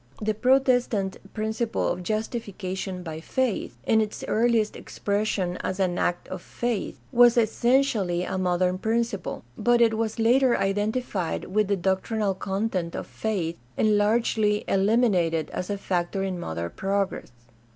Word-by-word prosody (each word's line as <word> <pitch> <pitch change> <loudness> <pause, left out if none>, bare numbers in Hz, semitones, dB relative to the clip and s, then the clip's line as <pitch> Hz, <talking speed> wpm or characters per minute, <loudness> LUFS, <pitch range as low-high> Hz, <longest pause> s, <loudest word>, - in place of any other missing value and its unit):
The 215 0 0
Protestant 245 -4 +2
principle 220 +1 -1
of 180 - -1
justification 195 -3 -4
by 160 -2 -6
faith, 245 +6 -2
in 220 -1 +4
its 215 -1 -4
earliest 225 -1 +2
expression 200 -3 -2
as 190 +1 -4
an 180 -2 +1
act 175 - -1
of 185 -1 -5
faith, 240 0 -3
was 240 -1 +6
essentially 225 -5 +2
a 185 0 -3
modern 180 0 +1
principle; 225 -1 -1 0.2
but 240 0 +3
it 230 -2 +4
was 220 0 -2
later 245 +2 +4
identified 205 -2 -1
with 210 -1 +3
the 200 0 +1
doc 190 +1 +1
trinal 215 -3 0
content 190 -2 -2
of - - -4
faith 180 -7 -3 0.2
and 215 -1 +3
largely 210 0 +2
eliminated 190 -6 +2
as 180 - -4
a 205 - -1
factor 185 0 -1
in 185 -2 -3
modern 85 - -4
progress. 195 - -2
205 Hz, 140 wpm, -26 LUFS, 185-225 Hz, 0.2 s, was